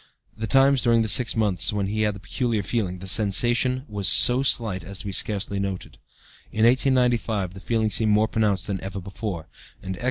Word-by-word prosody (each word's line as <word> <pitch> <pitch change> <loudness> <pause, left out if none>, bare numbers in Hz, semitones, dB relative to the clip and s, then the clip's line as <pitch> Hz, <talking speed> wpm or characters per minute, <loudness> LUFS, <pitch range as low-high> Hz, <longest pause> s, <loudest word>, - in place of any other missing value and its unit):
The 110 0 -5
times 135 +2 +3
during 115 -2 +2
this 110 - +1
six 125 -4 +3
months 105 -5 0
when 105 -2 -2
he 105 +2 -3
had 105 -1 0
the - - -10
'peculiar 115 0 -3
feeling,' 95 -5 -3
the 95 +1 -10
sensation 120 +6 +2
was 100 -3 -2
so 120 +9 +5
slight 110 -8 0
as 100 +2 -7
to - - -14
be 100 - -4
scarcely 100 +1 -1
noted. 100 -2 -6 0.5
In 110 +1 +1
1895, 120 -6 +1
the 95 - -11
feeling 110 0 -2
seemed 110 0 +1
more 105 +1 +2
pronounced 105 -3 -1
than 100 -2 -4
ever 95 0 -6
before, 95 -3 -7 0.4
and 95 0 -5
X. - - -13
105 Hz, 200 wpm, -23 LUFS, 95-120 Hz, 0.5 s, so